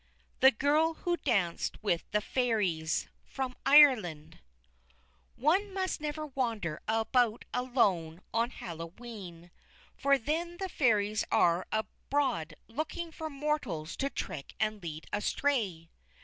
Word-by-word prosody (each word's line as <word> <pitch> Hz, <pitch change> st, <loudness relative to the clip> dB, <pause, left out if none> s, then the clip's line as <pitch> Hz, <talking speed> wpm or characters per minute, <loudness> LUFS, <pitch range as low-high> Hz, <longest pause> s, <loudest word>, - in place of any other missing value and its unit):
THE 265 Hz, -, +9 dB
GIRL 300 Hz, +6 st, +2 dB
WHO 350 Hz, -1 st, +2 dB
DANCED 200 Hz, -, -1 dB
WITH 175 Hz, -5 st, 0 dB
THE 210 Hz, -, +1 dB
FAIRIES 205 Hz, -11 st, 0 dB, 0.2 s
From 260 Hz, -2 st, -4 dB
Ireland 215 Hz, -, +5 dB, 1.0 s
One 375 Hz, -, +2 dB
must 375 Hz, -4 st, -1 dB
never 305 Hz, 0 st, -3 dB
wander 230 Hz, -, -2 dB
about 225 Hz, +1 st, +1 dB
alone 195 Hz, -10 st, +1 dB
on 230 Hz, +1 st, +2 dB
Hallowe'en, 175 Hz, -1 st, -9 dB, 0.4 s
for 280 Hz, 0 st, +3 dB
then 335 Hz, +7 st, -2 dB
the 380 Hz, 0 st, -3 dB
Fairies 215 Hz, -, +2 dB
are 170 Hz, +1 st, +3 dB
abroad 215 Hz, -, -1 dB
looking 315 Hz, +7 st, -4 dB
for 315 Hz, 0 st, -5 dB
mortals 275 Hz, -, -2 dB
to 275 Hz, -, 0 dB
trick 140 Hz, -, -6 dB
and 215 Hz, -1 st, 0 dB
lead 160 Hz, -2 st, -6 dB
astray. 205 Hz, -7 st, 0 dB
230 Hz, 115 wpm, -31 LUFS, 175-285 Hz, 1.0 s, THE